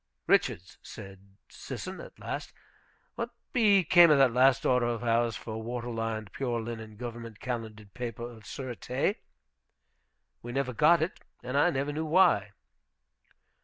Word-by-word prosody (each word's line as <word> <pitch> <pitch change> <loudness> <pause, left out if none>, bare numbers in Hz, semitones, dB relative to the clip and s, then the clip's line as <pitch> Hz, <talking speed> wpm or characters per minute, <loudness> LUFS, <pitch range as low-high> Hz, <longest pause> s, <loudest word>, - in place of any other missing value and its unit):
"Richards," 90 +2 +1
said 95 -1 -12
Sisson - - -7
at - - -12
last, - - -5 0.6
"what 235 0 -4 0.2
became 195 -7 +6
of 150 - +6
that 135 -3 +5
last 130 +1 +4
order 125 -2 +3
of 120 -1 -2
ours 115 0 +1
for 110 0 -6
water 120 +1 -4
lined, 115 -2 -3
pure 120 -3 -2
linen 110 -1 -7
government 115 -1 -7
calendered 110 -5 -6
paper 120 -2 -5
of 120 -2 -8
sureté? 130 - -3 1.2
We 120 +1 -7
never 135 -1 -1
got 155 +7 +5
it, 170 - -4 0.2
and 125 +2 -4
I 145 +5 +5
never 140 -2 -2
knew 160 +2 -2
why." 110 - +4
120 Hz, 140 wpm, -29 LUFS, 110-135 Hz, 1.2 s, became